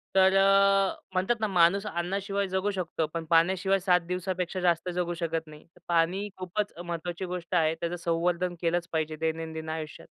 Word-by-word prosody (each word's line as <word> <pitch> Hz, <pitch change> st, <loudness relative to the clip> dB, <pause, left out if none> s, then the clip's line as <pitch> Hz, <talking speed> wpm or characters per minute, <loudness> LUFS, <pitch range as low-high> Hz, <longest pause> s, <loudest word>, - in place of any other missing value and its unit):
तर 190 Hz, 0 st, +5 dB
अ, 195 Hz, 0 st, +4 dB, 0.2 s
म्हणतात 190 Hz, +6 st, +1 dB
ना 215 Hz, -, +2 dB
माणूस 190 Hz, +2 st, +3 dB
अन्नाशिवाय 195 Hz, +3 st, -2 dB
जगू 190 Hz, +2 st, 0 dB
शकतो, 170 Hz, -4 st, -2 dB
पण 165 Hz, -1 st, -3 dB
पाण्याशिवाय 190 Hz, +4 st, +3 dB
7 180 Hz, -1 st, +3 dB
दिवसापेक्षा 180 Hz, 0 st, -2 dB
जास्त 175 Hz, 0 st, +1 dB
जगू 175 Hz, -1 st, -1 dB
शकत 165 Hz, -1 st, -3 dB
नाही. 150 Hz, 0 st, -13 dB
तर -, -, -21 dB
पाणी 175 Hz, +4 st, +1 dB
खूपच 185 Hz, +3 st, -3 dB
महत्त्वाची 175 Hz, +1 st, -4 dB
गोष्ट 180 Hz, 0 st, -4 dB
आहे 160 Hz, -2 st, +3 dB
त्याचं 170 Hz, +1 st, -3 dB
संवर्धन 175 Hz, +1 st, 0 dB
केलंच 170 Hz, 0 st, 0 dB
पाहिजे 155 Hz, -1 st, -1 dB
दैनंदिन 160 Hz, 0 st, -3 dB
आयुष्यात. 155 Hz, -1 st, -6 dB
175 Hz, 165 wpm, -28 LUFS, 165-190 Hz, 0.2 s, तर